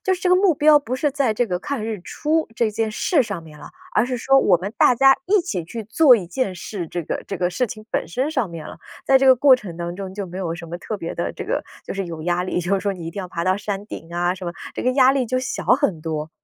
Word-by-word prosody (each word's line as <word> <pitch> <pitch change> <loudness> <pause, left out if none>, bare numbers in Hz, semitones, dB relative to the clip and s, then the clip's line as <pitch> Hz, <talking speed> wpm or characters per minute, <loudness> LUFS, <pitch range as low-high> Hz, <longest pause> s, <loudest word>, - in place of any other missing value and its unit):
就 380 - +2
是 365 - -10
这 360 - +2
个 - - +7
目 370 -2 +4
标 300 +1 +6
不 255 -3 -4
是 290 +3 +1
在 270 -5 0
这 240 +3 +1
个 180 -4 -2
看 230 +3 -4
日 220 -3 -4
出 310 - -1
这 230 -2 +1
件 220 +1 -1
事 275 - +2
上 205 -7 -5
面 155 -2 -14
了， - - -10 0.3
而 225 - +3
是 255 - -2
说 270 +3 +4
我 190 -9 +4
们 195 +4 -6
大 - - +6
家 270 +2 +6
一 415 +3 +4
起 260 - -3
去 220 +7 -7
做 250 +4 +6
一 190 -6 -5
件 195 +1 -2
事， 175 0 -6
这 175 +1 -4
个 - - -4
这 195 - -3
个 180 0 0
事 245 +8 0
情 215 0 -9
本 - - -1
身 260 - -1
上 260 -9 -1
面 165 -2 -8
了。 - - -10 0.3
在 270 - +5
这 270 - +2
个 260 -1 +7
过 270 +1 +7
程 200 -9 -6
当 170 0 -4
中 190 0 -7
就 205 0 -4
没 180 +1 -8
有 170 -3 -2
什 170 0 -9
么 170 +1 -6
特 215 +4 -5
别 170 -4 -5
的 170 - -2
这 - - -6
个 - - -1 0.2
就 - - -5
是 195 -2 -3
有 165 -2 -7
压 175 +1 0
力， 180 - -2
就 180 +2 -2
是 195 - +2
说 200 +1 -1
你 170 -3 -8
一 - - -4
定 200 - -5
要 185 - -6
爬 170 -1 -3
到 185 - +3
山 205 -1 -4
顶 165 -6 -9
啊 175 +1 +1
什 185 -1 -8
么， 170 - -3 0.2
这 - - -4
个 255 - +2
压 260 0 +5
力 265 -3 0
就 255 +3 0
小 255 - -3
很 250 - +2
多。 155 -1 -4
205 Hz, 325 characters per minute, -22 LUFS, 175-260 Hz, 0.3 s, 个